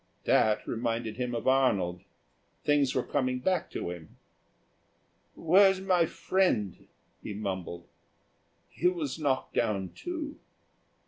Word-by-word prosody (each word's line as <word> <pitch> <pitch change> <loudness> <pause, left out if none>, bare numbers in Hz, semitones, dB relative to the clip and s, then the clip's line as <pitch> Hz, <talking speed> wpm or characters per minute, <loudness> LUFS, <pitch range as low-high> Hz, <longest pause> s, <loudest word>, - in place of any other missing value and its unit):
That 105 -1 +3
reminded 115 -1 -2
him 125 -1 -2
of 115 - -3
Arnold. 100 -10 +2 0.6
Things 145 -3 +2
were 130 - +1
coming 130 -3 -1
back 185 +8 0
to 85 - -4
him. 85 -3 -11 1.2
"Where's 190 +3 +5
my 180 -3 +2
friend?" 155 - 0 0.3
he 105 - -6
mumbled. 95 -4 -4 0.8
"He 175 - 0
was 165 -5 -2
knocked 135 -4 -1
down, 100 -5 0
too." 320 -4 -6
130 Hz, 115 wpm, -29 LUFS, 105-170 Hz, 1.2 s, Where's